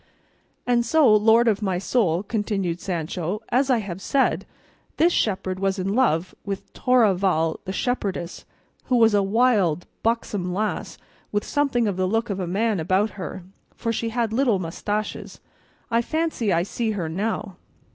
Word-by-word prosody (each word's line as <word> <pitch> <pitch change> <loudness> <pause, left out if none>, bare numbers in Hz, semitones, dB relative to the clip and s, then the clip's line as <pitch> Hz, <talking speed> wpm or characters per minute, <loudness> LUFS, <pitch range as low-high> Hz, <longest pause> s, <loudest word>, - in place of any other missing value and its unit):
"And 240 -1 +2
so, 250 -3 +5
lord 225 +3 +5
of 215 -1 +2
my 190 -3 0
soul," 185 -3 +1
continued 200 -5 -2
Sancho, 175 +2 -3
as 265 +2 +2
I 255 - +4
have 195 -4 -5
said, 275 +4 +1 0.5
this 340 +2 +4
shepherd 185 -3 -1
was 195 0 0
in 190 +1 -1
love 185 -8 +1
with 195 -1 -6
Torralva 190 -9 +2
the 190 - -3
shepherdess, 195 -6 -3 0.4
who 255 - +1
was 225 -2 +5
a 205 - +4
wild 195 -6 +2 0.2
buxom 210 -5 -1
lass 215 +2 -2 0.3
with 205 0 0
something 275 -6 +1
of 195 -3 -2
the 185 0 +1
look 225 +3 0
of 195 - -3
a 180 - -2
man 205 +2 0
about 190 +6 +1
her, 190 -1 -7 0.3
for 230 -1 -2
she 230 +1 -2
had 230 -1 -1
little 240 -4 +2
moustaches; 205 +5 -4 0.5
I 230 +1 +3
fancy 310 -6 -1
I 170 -1 +2
see 220 +3 -2
her 170 -4 -2
now." 195 +2 -3
205 Hz, 160 wpm, -24 LUFS, 185-230 Hz, 0.5 s, so